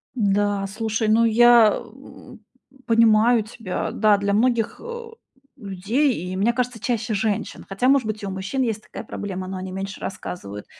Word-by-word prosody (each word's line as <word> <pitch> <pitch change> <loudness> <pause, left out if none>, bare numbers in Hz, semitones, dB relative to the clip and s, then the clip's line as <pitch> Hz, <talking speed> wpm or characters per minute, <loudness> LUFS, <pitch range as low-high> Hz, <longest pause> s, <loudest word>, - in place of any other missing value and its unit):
Да, 205 -2 +1
слушай, 220 +2 -2
ну, 220 +2 +4
я, 230 -1 +6
э, 245 +1 -14 0.5
понимаю 230 0 +4
тебя. 215 -3 -5
Да, 210 -2 +3
для 200 0 -1
многих, 230 +1 +1
э, 475 0 -7 0.5
людей 220 +6 0
и, 185 - -4
мне 210 +5 +1
кажется, 250 -1 -2
чаще 225 0 -2
женщин, 205 0 -2
хотя, 195 +6 0
может 270 -4 +3
быть, 215 -1 -4
и - - -3
у 195 - -4
мужчин 190 +8 -2
есть 220 -3 -2
такая - - -9
проблема, 190 -4 -6
но 190 0 -5
они 185 0 -6
меньше 195 +1 -6
рассказывают. 105 - -7
215 Hz, 165 wpm, -22 LUFS, 195-235 Hz, 0.5 s, я